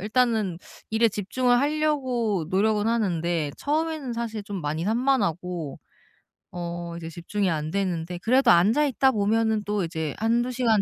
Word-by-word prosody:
일단은 215 -4 +1 0.3
일에 225 +1 +3
집중을 245 +5 +1
하려고 260 - 0
노력은 210 +2 +2
하는데 175 -9 0
처음에는 305 -3 -1
사실 225 -2 -4
좀 200 -2 -5
많이 155 +2 -2
산만하고 185 - 0 0.7
어 170 -1 -5
이제 165 -1 -7
집중이 185 +4 -2
안 155 -1 -2
되는데 180 -3 -2
그래도 255 0 +4
앉아 210 +12 +4
있다 265 -1 +3
보면은 220 0 +1
또 205 -2 -1
이제 160 -3 -3
1-2 235 +3 +1
시간 230 -4 +2
210 Hz, 305 characters per minute, -25 LUFS, 175-240 Hz, 0.7 s, 그래도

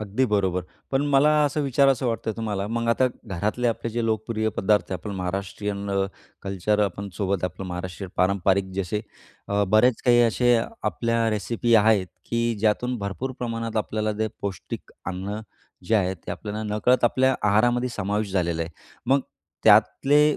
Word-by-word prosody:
अगदी 105 +5 0
बरोबर. 95 -4 +1 0.3
पण 135 +1 +2
मला 140 +1 +4 0.2
असं 145 +1 0
विचारावसं 135 -1 +3
वाटतं 115 -1 -1
तुम्हाला 105 -3 -2
मग 115 +2 -2
आता 130 +2 +3 0.2
घरातले 105 +5 -1
आपले 115 0 -2
जे 115 +1 -1
लोकप्रिय 110 0 -1
पदार्थ 105 -1 +2
आपण 95 +4 -5
महाराष्ट्रीयन 100 +2 -3
अ, 95 0 +1 0.4
कल्चर 100 +2 0
आपण 100 +1 -4
सोबत 100 -2 -1
आपलं 90 +2 -4
महाराष्ट्रीयन 90 +1 -6
पारंपरिक 95 0 +2
जसे 100 +2 -2 0.5
अ, 100 0 +2
बरेच 110 +3 +4
काही 120 -1 +6
असे 120 +1 +3 0.3
आपल्या 115 -1 0
रेसिपी 115 +2 0
आहेत, 105 -3 +4 0.2
की 115 0 0
ज्यातून 115 +4 +1
भरपूर 100 +7 -4
प्रमाणात 115 -2 -3
आपल्याला 110 0 -1
जे 110 - +1
पौष्टिक 100 -3 -6 0.2
अन्न 95 +3 -4 0.4
जे 115 - +1
आहेत 95 -3 +1
ते - - -4
आपल्याला 105 +3 -5
नकळत 125 +4 +3
आपल्या 130 +2 +3
आहारामध्ये 120 +4 +3
समावेश 100 +1 -1
झालेलं 85 -3 0
आहे. 80 - -6 0.4
मग 135 +2 +4 0.4
त्यातले 150 +2 +5
105 Hz, 155 wpm, -24 LUFS, 100-120 Hz, 0.5 s, काही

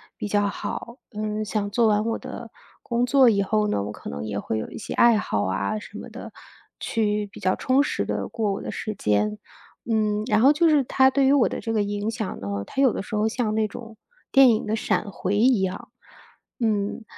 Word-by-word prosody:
比 215 - -5
较 205 0 +2
好。 235 +3 -5 0.2
嗯， 215 0 -2
像 210 -1 -2
做 230 +2 +2
完 210 0 +2
我 230 - -1
的 - - -8 0.3
工 240 0 0
作 260 0 +5
以 200 -3 +2
后 210 +2 +1
呢， 100 - 0
我 105 - -5
可 105 - -9
能 70 0 -5
也 105 -2 -3
会 110 - -3
有 - - -5
一 - - -8
些 - - -6
爱 235 -2 +5
好 105 - -1
啊 95 - -1
什 210 - -9
么 - - -8
的， - - -9 0.5
去 210 -2 -1
比 200 - -13
较 185 - +2
充 260 +2 +2
实 - - -2
地 - - -2
过 215 -3 -1
我 - - -5
的 - - -5
时 215 -1 -5
间。 105 - 0 0.5
嗯， 215 -1 +1
然 215 -3 +3
后 270 +6 +6
就 330 +2 +3
是 295 -4 +3
它 265 +2 +4
对 270 +1 +2
于 270 - +5
我 275 -5 +4
的 - - -4
这 225 - -3
个 215 -2 +2
影 205 +1 -2
响 225 -3 -4
呢， 100 - -6 0.2
它 270 - -2
有 265 -4 +4
的 - - -4
时 - - -11
候 210 +1 +2
像 220 -1 -1
那 220 -1 +1
种 225 +1 -10 0.3
电 270 -2 +7
影 220 - 0
的 215 - -2
闪 215 -1 -1
回 190 +1 -2
一 235 +2 +4
样。 185 0 -4 0.7
嗯， 210 -1 0
215 Hz, 245 characters per minute, -24 LUFS, 205-235 Hz, 0.7 s, 电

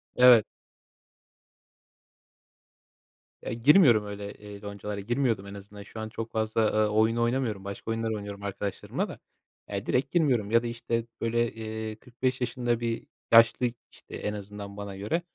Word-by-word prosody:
Evet. 125 -3 +8 3.0
E, - - -3
girmiyorum 120 - +6
öyle, 100 0 -6
eee, 105 -1 -11
loncalara, 100 0 -5
girmiyordum 115 -1 0
en 100 - -8
azından. 100 0 -10
Şu 110 - -10
an 110 0 -4
çok 115 +1 -6
fazla, 110 0 0
eee, - - -1
oyun 110 +2 +3
oynamıyorum. 115 -4 0
Başka 100 +3 -5
oyunlar 115 0 -1
oynuyorum 100 -1 -6
arkadaşlarımla 100 0 -3
da. - - -9 0.5
Eee, 100 0 -3
direkt 130 +2 0
girmiyorum 125 - +2
ya 115 +1 +4
da, 120 - -2
işte, 115 0 -2 0.2
böyle, 120 0 +1
eee, 110 -1 -5
45 125 +3 -3
yaşında 120 -1 0
bir 115 -1 -3 0.3
yaşlı, 115 +2 +7 0.3
işte, - - -12
en 105 - -3
azından 100 0 -8
bana 100 -1 -6
göre, 105 - -1
110 Hz, 150 wpm, -28 LUFS, 100-120 Hz, 3.0 s, Evet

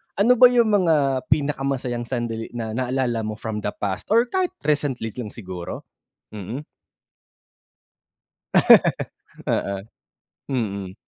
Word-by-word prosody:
Ano 230 +5 +4
ba 250 - +10
yung 235 -3 +3
mga 150 -9 +2
pinakamasayang 135 -4 -1
sandali 115 -2 -3
na 110 -2 -3
naaalala 125 -1 -1
mo 110 - -4
from 110 0 -4
the 105 0 -2
past 95 -2 -2
or 230 +2 +4
kahit 370 -1 0
recently 140 -6 0
lang 120 0 -6
siguro? 95 -5 -7 0.5
Mm. 110 +8 -6 2.8
Oo. 100 -1 -1 0.7
Mm. 100 -7 -3
125 Hz, 110 wpm, -23 LUFS, 110-150 Hz, 2.8 s, ba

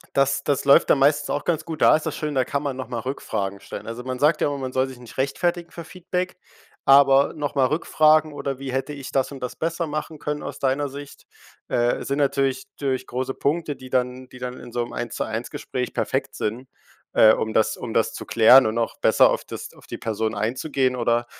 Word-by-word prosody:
das 140 0 +2
das 140 -2 0
läuft 140 - +5
dann - - +5
meistens 145 +2 +3
auch 145 - -2
ganz 160 -2 0
gut. 160 -1 -6
Da - - +7
ist 155 - -5
das - - -2
schön, 150 -1 -3
da 130 -1 +2
kann 140 +3 -2
man 140 -3 -3
noch 130 -3 -6
mal 120 -2 -3
Rückfragen 100 -6 -4
stellen. - - -8
Also, 115 +2 -6
man 130 -1 -4
sagt 150 +3 +3
ja - - +2
immer, 145 -1 -3
man 130 -1 -4
soll 130 +1 +1
sich 130 -2 -10
nicht 120 0 -14
rechtfertigen 170 +6 -1
für 170 - -9
Feedback, 180 +2 -4 0.5
aber 140 0 +6
noch 145 -2 -3
mal 135 -2 +3
Rückfragen 155 +1 +3
oder 140 -2 -4
wie 135 -1 -5
hätte 135 +3 -2
ich 140 -2 -8
das 135 -1 +1
und 135 - -9
das 125 - -4
besser 165 +1 -2
machen 155 +1 -5
können 150 0 -4
aus - - -6
deiner 140 +2 0
Sicht, 140 +1 -10 0.4
äh, 120 0 +1
sind 140 +1 -2
natürlich 140 -2 +1
natürlich 135 -2 -2
große 130 +1 -3
Punkte, 150 0 -1
die 130 0 -12
dann 125 0 -1
die 125 - -13
dann 125 0 -6
in 120 - -11
so 120 - -1
'nem 120 - -7
Eins-zu-eins-Gespräch 120 -2 -4
perfekt - - -2
sind, 120 +5 -4 0.4
äh, 110 -1 +7
um 110 0 -2
das 110 - +2
um - - -6
das - - +2
zu - - -6
klären 125 +3 +7
und 110 +1 -1
auch 115 - -1
besser - - +5
auf - - -2
das - - -8
auf - - -18
die - - -7
Person 110 0 -2
einzugehen. 130 +4 -1
Oder, 120 0 +1
135 Hz, 225 wpm, -23 LUFS, 125-145 Hz, 0.5 s, Da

